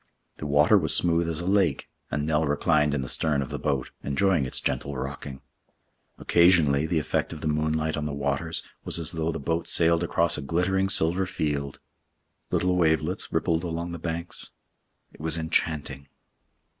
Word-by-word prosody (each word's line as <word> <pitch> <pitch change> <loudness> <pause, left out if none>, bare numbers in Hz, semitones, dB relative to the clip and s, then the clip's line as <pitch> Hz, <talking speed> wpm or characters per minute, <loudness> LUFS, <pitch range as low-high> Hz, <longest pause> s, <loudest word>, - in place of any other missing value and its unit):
The 75 - -5
water 75 +1 +5
was - - +2
smooth 85 -1 +2
as 80 0 -2
a - - -5
lake, 95 -1 +1 0.2
and 75 0 -2
Nell 80 0 +1
reclined 75 0 +2
in 70 - -2
the - - -6
stern 75 -1 +1
of 65 - -9
the - - -4
boat, 70 -3 -2
enjoying 80 +1 +1
its - - -2
gentle 65 +2 -2
rocking. 65 +1 -6 0.8
Occasionally 80 -4 +4
the 85 0 0
effect 75 - -1
of 75 - -9
the 80 - -2
moonlight 80 +1 0
on 75 0 -3
the - - -4
waters 70 +3 -2 0.2
was - - -1
as 80 -3 -1
though 80 -1 -1
the 80 - -5
boat 80 +4 -2
sailed 85 0 +4
across 85 -2 +1
a - - -5
glittering 90 +6 0
silver 90 0 +2
field. 70 -5 -3 0.7
Little 90 0 +1
wavelets 80 +2 +1
rippled 80 0 0
along 85 0 -4
the 85 - -6
banks. 85 +1 -4 0.6
It - - -18
was 80 +1 -2
enchanting. 75 -4 -1
80 Hz, 175 wpm, -26 LUFS, 75-85 Hz, 0.8 s, water